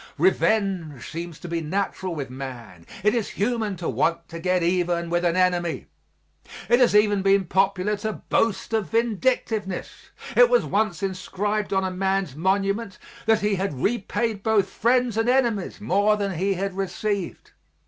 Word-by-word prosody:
Revenge 175 - +1
seems 170 -1 -6
to - - -9
be 170 -1 -2
natural 185 +1 -2
with 140 -4 -5
man; 120 -10 -8 0.2
it 210 - +4
is 230 -4 -1
human 220 -1 -1
to 170 -1 -5
want 170 0 0
to 165 - -7
get 180 0 +1
even 175 -1 0
with 175 0 +1
an 170 -1 +2
enemy. 180 -2 0 0.8
It 240 - +5
has 245 -4 +4
even 205 -1 +4
been 195 0 +3
popular 195 +3 +1
to 215 +1 -3
boast 225 +1 -1
of 215 -7 0
vindictiveness; 225 -3 -1 0.3
it - - +7
was - - +3
once 200 -3 0
inscribed 195 +2 -2
on 190 -1 +1
a 190 - -1
man's 190 -5 -1
monument 195 +4 0 0.3
that 225 -1 +4
he 210 0 +1
had 190 -5 -2
repaid 225 - -1
both 205 -3 +2
friends 245 -1 +1
and 225 +2 +2
enemies 235 -8 +1
more 210 +1 +2
than 200 -1 -1
he 190 +3 0
had 195 +1 -2
received. 195 0 -3
195 Hz, 160 wpm, -24 LUFS, 175-215 Hz, 0.8 s, it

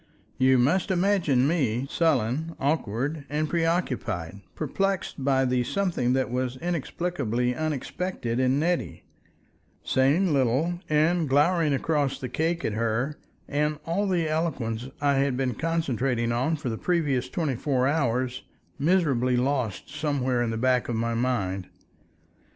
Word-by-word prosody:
You 130 0 +5
must 155 +10 +2
imagine 175 -9 +2
me, 135 -7 0
sullen, 155 0 0
awkward, 140 +1 -1
and 150 +2 0
preoccupied, 125 - -1
perplexed 190 -1 -2
by 135 -1 +3
the 125 -1 +1
something 165 -5 0
that 130 -2 0
was 125 0 -2
inexplicably 145 -7 -1
unexpected 150 -2 -3
in 130 +1 +2
Nettie, 170 +3 -1 0.8
saying 150 +7 +2
little, 140 +7 +1
and 155 +1 +2
glowering 150 +3 +3
across 145 0 0
the 130 - -5
cake 165 +2 -1
at 110 - -1
her, 115 +6 -1 0.3
and 150 +1 0
all 195 +5 0
the 175 -4 +1
eloquence 130 -8 -2
I 140 -1 +3
had 135 -2 +1
been 130 -2 0
concentrating 130 -6 0 0.2
for 145 -5 -4
the 110 - -4
previous 145 -8 0
twenty 150 -3 -1
four 130 0 +1
hours, 130 -4 0 0.4
miserably 140 -7 +2
lost 125 -8 -1
somewhere 140 -5 0
in 120 - 0
the 115 - -2
back 125 +1 +1
of 120 - -1
my 115 +1 -1
mind. 100 -6 -1
135 Hz, 135 wpm, -26 LUFS, 125-160 Hz, 0.8 s, You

